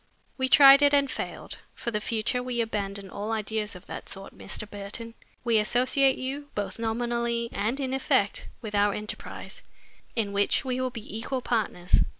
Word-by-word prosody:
We 260 -1 0
tried 275 +1 +9
it 285 0 +6
and 280 -1 +3
failed. - - -5 0.2
For 235 - -4
the 210 -1 -1
future 230 +3 0
we 250 -1 -3
abandon 200 -3 -2
all 210 +2 -4
ideas 215 -1 -2
of 180 - -11
that - - -7
sort, 195 0 -8
Mr. 215 - -3
Burton. 210 +3 -6 0.3
We 230 -2 +3
associate 255 +4 +3
you, 275 +3 -4
both 200 0 -3
nominally 235 +1 -1
and 220 +7 -1
in 265 -2 -1
effect, 265 -6 +1 0.2
with 215 -2 -5
our 205 0 +3
enterprise, 215 - -7 0.5
in 210 -4 -1
which 200 +6 +2
we 255 0 -1
will 255 - 0
be 225 -4 -8
equal 250 +3 -3
partners. 205 -6 +1
230 Hz, 170 wpm, -27 LUFS, 210-255 Hz, 0.5 s, tried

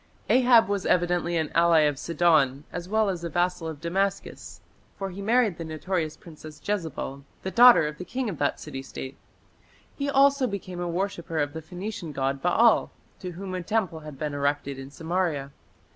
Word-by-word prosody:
Ahab 245 -4 +6
was 200 -2 -1
evidently 175 -1 +1
an 160 -2 -1
ally 170 -1 +5
of 145 -2 +1
Sidon 155 -5 +2
as 175 0 -5
well 220 0 +2
as 180 -3 -3
a 170 - -3
vassal 175 0 0
of 160 -3 -6
Damascus, 195 +4 -3 0.4
for 195 -1 -4
he 190 +3 -8
married 220 -4 +2
the - - -3
notorious 160 0 -3
princess 155 -5 -12
Jezebel, 160 -8 -3 0.2
the 190 - -3
daughter 240 -7 +8
of 150 0 -7
the - - -4
king 255 +6 -3
of 185 -8 -5
that 145 - 0
city 135 - -7
State. 135 0 -8 0.8
He 280 0 -2
also 275 -1 +4
became 185 -4 -6
a 175 0 -2
worshipper 170 -2 -3
of 145 -1 0
the 160 - -6
Phoenician 180 +1 -6
god 135 0 -1
Baal, 220 +6 +4 0.3
to 180 -2 -6
whom 185 +2 -6
a 185 - -2
temple 185 -3 -1
had 150 -3 -10
been 150 +1 -3
erected 140 -1 -1
in 135 0 -8
Samaria. 160 -3 -2
175 Hz, 185 wpm, -26 LUFS, 155-195 Hz, 0.8 s, daughter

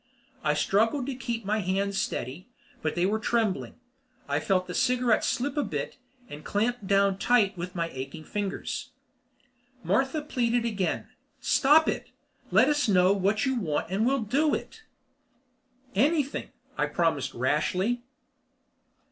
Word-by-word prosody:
I - - +2
struggled 225 +7 +2
to 275 - -3
keep 235 -4 -4
my 215 +2 +1
hands 195 +1 0
steady, 135 - -4 0.3
but 155 - -1
they 175 - +2
were 215 +3 +1
trembling. 220 -4 0 0.5
I 145 +1 0
felt 185 +4 +1
the 180 - -6
cigarette 250 -1 +2
slip 280 +5 -1
a 295 - +2
bit - - -4 0.3
and 150 +1 -9
clamped 220 0 -1
down 195 0 +3
tight 240 -4 +4
again - - -25
with 180 +1 -6
my 170 -1 0
aching 135 +4 -7
fingers. 205 +2 -4 0.9
Martha 270 +3 +1
pleaded 240 -5 0
again: 205 -5 -1 0.3
"Stop 300 +4 +4
it! - - -2 0.4
Let - - +5
us 295 -3 +2
know 185 0 +5
what 200 +3 +1
you 265 - +1
want 160 -3 -2
and 200 +3 +1
we'll 260 0 +2
do 285 +8 +2
it." 445 - -8 1.1
"Anything," 285 - +1 0.3
I - - +2
promised - - 0
rashly. 220 +6 0
215 Hz, 145 wpm, -27 LUFS, 185-250 Hz, 1.1 s, Let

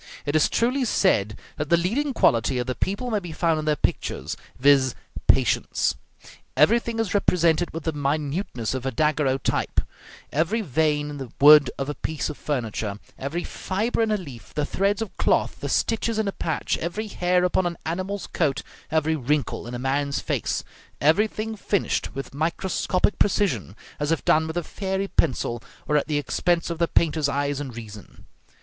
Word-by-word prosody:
It 145 - -1
is 155 - +4
truly 255 +3 +1
said 105 - +2 0.2
that 150 0 -3
the 170 - +5
leading 235 +13 0
quality 115 +3 +3
of 125 - -1
the 130 - -2
people 200 - -2
may 215 - +2
be 175 -4 -8
found 160 0 +1
in 155 - -4
their 155 -1 +2
pictures; - - -2 0.2
viz., 135 -1 +4 0.3
patience. - - +2 0.6
Everything 230 - +3
is 225 -5 -1
represented 175 -4 +2
with 165 0 -6
the 160 - 0
minuteness 145 - -2
of 130 -1 -3
a - - 0
daguerreotype; 140 0 +1 0.5
every 170 - +1
vein 150 - 0
in 145 - -6
the 130 -4 -7
wood 145 -1 +8
of 135 - -3
a 145 - -2
piece 155 +1 -3
of 150 - -10
furniture, 110 -7 -2 0.2
every 155 +6 -3
fibre 215 +5 -2
in 225 - +2
a 215 - +2
leaf, 135 - -11
the 150 - 0
threads 200 +6 0
of 220 - -10
cloth, - - +1
the - - -4
stitches 225 0 0
in 220 -2 0
a - - 0
patch, 165 -4 -2
every 175 +7 -3
hair 180 -3 +1
upon 180 0 +2
an 170 -1 -4
animal's 185 +4 -3
coat, 145 -5 -1 0.3
every 160 0 +1
wrinkle 145 -2 -1
in 120 - -5
a - - -2
man's 140 +2 0
face; - - -1 0.4
everything 215 +8 +2
finished 200 -2 -1
with 135 0 -6
microscopic 180 +5 0
precision, 175 - +1 0.2
as 145 +1 0
if 165 - 0
done 160 +1 +4
with 160 +2 -4
a 175 - 0
fairy 190 +2 -3
pencil, 120 -2 0 0.3
or 150 - +1
at 150 - +2
the 150 -1 0
expense 165 +5 0
of 165 - -4
the 170 - +3
painter's 155 -3 +2
eyes 140 0 -1
and 130 -5 -6
reason. 110 -3 -11
155 Hz, 180 wpm, -24 LUFS, 140-190 Hz, 0.6 s, wood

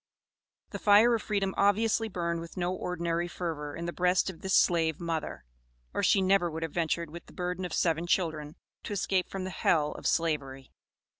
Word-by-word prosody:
The - - -5
fire 215 +3 +6
of 230 - 0
freedom 195 -3 -1
obviously 220 +3 +2
burned 170 -3 -2
with 165 +3 -10
no 180 0 0
ordinary 170 -1 -2
fervor 160 -5 -5
in 170 - -5
the 170 - -3
breast 180 +1 +2
of 165 - -17
this 190 0 +1
slave 165 -3 +3
mother, 165 -2 -4 0.5
or - - -1
she 195 - +4
never 190 -2 +3
would 160 0 -5
have 165 - -3
ventured 170 -1 -1
with 170 +1 -10
the - - -15
burden 180 0 -3
of 175 - -5
seven 165 0 +1
children, 155 -4 -1 0.3
to - - -4
escape 190 -2 0
from 195 -1 -4
the 185 - -4
hell 150 -4 +1
of - - -4
Slavery. 140 -5 -1
175 Hz, 195 wpm, -29 LUFS, 165-190 Hz, 0.5 s, fire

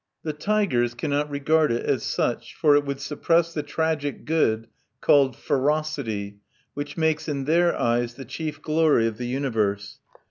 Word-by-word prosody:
The 155 - -2
tigers 150 - 0
cannot 145 +4 -1
regard 150 +1 +2
it 115 - -1
as - - +1
such, - - -2
for 150 -2 +4
it 145 - +3
would 140 -1 -3
suppress 165 +4 +1
the 150 - -2
tragic 150 -1 -2
good 115 -9 +1 0.3
called 135 -4 +4
ferocity, 135 -9 -1 0.3
which 145 +1 -6
makes, 160 -1 +1
in 140 -2 -2
their 170 +3 +3
eyes, 120 0 0
the 135 - -9
chief 155 +4 -5
glory 155 -6 +3
of 115 0 -3
the 120 - -3
universe. 110 -6 -1
145 Hz, 155 wpm, -24 LUFS, 120-155 Hz, 0.3 s, for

